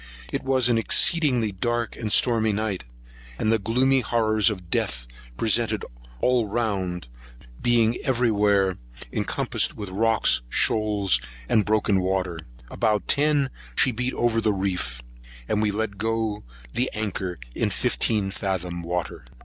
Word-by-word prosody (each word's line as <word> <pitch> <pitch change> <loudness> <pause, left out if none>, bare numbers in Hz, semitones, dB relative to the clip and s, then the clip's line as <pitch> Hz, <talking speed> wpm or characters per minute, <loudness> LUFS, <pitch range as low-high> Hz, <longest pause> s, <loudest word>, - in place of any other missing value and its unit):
It - - -1
was 130 -2 +2
an 120 -2 +3
exceeding 130 -2 +3
dark, 120 -1 -1
stormy 110 0 +3
night; 100 - -2 0.5
and 110 - +1
the 115 - +3
gloomy 130 +6 +2
horrors 110 -3 +2
of 90 -5 -7
death - - -1 0.3
presented 110 -1 +1
us - - -15 0.3
all 125 -3 +2
round, 100 - -2 0.5
being 120 -1 +3
every 125 -3 +2
where 100 -3 +2 0.3
encompassed - - 0
with 105 -3 -5
rocks, 110 - +3
shoals, 105 - +2 0.3
and 105 -3 +3
broken 105 -2 +2
water. 90 -2 -1 0.3
About 105 -2 0
ten 145 -2 +2 0.2
she 130 - +4
beat 125 +2 -2
over 115 -1 +1
the 110 -1 +2
reef; 90 -11 -3 0.4
and 105 - 0
we 110 - +2
let 100 -1 -3
go 110 -1 -1 0.3
the 125 +1 +1
anchor 95 -4 -3 0.2
in - - 0
fifteen 105 -4 0
fathom 90 -3 -3
water. 85 -4 -4
110 Hz, 135 wpm, -24 LUFS, 95-120 Hz, 0.5 s, she